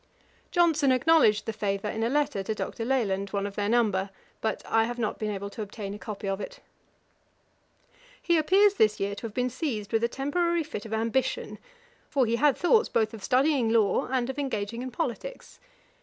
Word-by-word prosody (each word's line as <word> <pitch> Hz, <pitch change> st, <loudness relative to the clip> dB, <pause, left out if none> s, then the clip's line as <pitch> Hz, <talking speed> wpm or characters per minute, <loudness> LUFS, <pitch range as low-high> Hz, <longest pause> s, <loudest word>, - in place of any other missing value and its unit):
Johnson 320 Hz, -6 st, +3 dB
acknowledged 255 Hz, -6 st, +4 dB
the 225 Hz, -, -3 dB
favour 200 Hz, -1 st, -2 dB
in 220 Hz, +1 st, -3 dB
a 230 Hz, -, +1 dB
letter 290 Hz, -6 st, 0 dB
to 215 Hz, +3 st, -3 dB
Dr. 225 Hz, -, -4 dB
Leland, 205 Hz, -6 st, 0 dB
one 200 Hz, 0 st, -2 dB
of 200 Hz, -, -5 dB
their 205 Hz, 0 st, -1 dB
number; 210 Hz, -5 st, +2 dB, 0.3 s
but 220 Hz, -, -2 dB
I 225 Hz, 0 st, +2 dB
have 240 Hz, +1 st, -4 dB
not 225 Hz, -3 st, -2 dB
been 215 Hz, -, -2 dB
able 200 Hz, 0 st, -4 dB
to 220 Hz, -, -7 dB
obtain 205 Hz, -1 st, -6 dB
a 205 Hz, -, -8 dB
copy 210 Hz, -2 st, -6 dB
of 195 Hz, +1 st, -2 dB
it. -, -, -7 dB, 1.6 s
He 340 Hz, -, +1 dB
appears 390 Hz, +6 st, +4 dB
this 215 Hz, -, +2 dB
year 200 Hz, +1 st, -1 dB
to 215 Hz, +3 st, -5 dB
have 215 Hz, -, -13 dB
been 250 Hz, 0 st, 0 dB
seized 230 Hz, -7 st, -3 dB
with 225 Hz, 0 st, +2 dB
a -, -, +4 dB
temporary 340 Hz, +6 st, 0 dB
fit 225 Hz, -8 st, -7 dB
of 220 Hz, -, -6 dB
ambition, 230 Hz, +4 st, -1 dB, 0.5 s
for 270 Hz, -3 st, +2 dB
he 230 Hz, +1 st, 0 dB
had 290 Hz, +1 st, +3 dB
thoughts 445 Hz, +6 st, +3 dB
both 220 Hz, -2 st, +1 dB
of 215 Hz, -3 st, -9 dB
studying 260 Hz, -1 st, +2 dB
law 225 Hz, -3 st, +2 dB
and 255 Hz, -2 st, 0 dB
of 265 Hz, +2 st, -4 dB
engaging 230 Hz, -4 st, -3 dB
in 255 Hz, -, -4 dB
politics. 380 Hz, -, -5 dB
230 Hz, 200 wpm, -27 LUFS, 210-280 Hz, 1.6 s, acknowledged